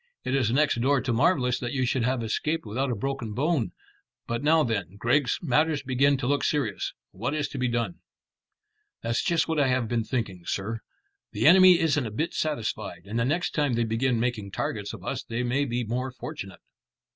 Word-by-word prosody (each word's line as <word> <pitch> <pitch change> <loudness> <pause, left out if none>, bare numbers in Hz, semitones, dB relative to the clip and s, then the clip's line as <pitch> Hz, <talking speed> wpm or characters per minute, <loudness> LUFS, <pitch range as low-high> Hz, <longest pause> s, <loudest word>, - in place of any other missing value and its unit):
"It 130 - -2
is 125 -5 +2
next 140 -2 +2
door 140 +2 +3
to 125 -2 -1
marvellous 125 -1 +2
that 120 -1 -4
you 130 -2 +1
should 125 +1 0
have 125 0 0
escaped 150 +8 -1
without 130 +6 -1
a 120 - 0
broken 125 -1 -3
bone. 145 0 0 0.5
But 120 0 -2
now 155 +2 +4
then, 100 - -2
Griggs, 125 +3 +2
matters 155 +1 +2
begin 135 +2 +3
to 130 - -4
look 140 +1 +1
serious. 135 -10 -1 0.2
What 120 +10 -3
is 150 -2 0
to 135 - -6
be 125 - +1
done?" 115 -6 -2 1.0
"That's 115 +1 0
just 170 -3 +2
what 160 -2 0
I 140 - +4
have 130 -2 +1
been 115 0 0
thinking, 105 -7 -3
sir. 110 +4 -2 0.5
The 105 - 0
enemy 185 +1 +8
isn't 145 -6 +1
a - - -4
bit 150 +11 -2
satisfied, 110 - -3
and 110 +4 -3
the 115 - +2
next 170 +7 0
time 145 -4 +1
they 120 - +2
begin 115 +2 +1
making 115 -4 -1
targets - - -3
of - - -10
us - - -2
they 115 +2 -3
may 130 +4 +1
be 120 -1 -1
more 125 +4 -2
fortunate." 100 -5 -8
125 Hz, 205 wpm, -27 LUFS, 115-145 Hz, 1.0 s, enemy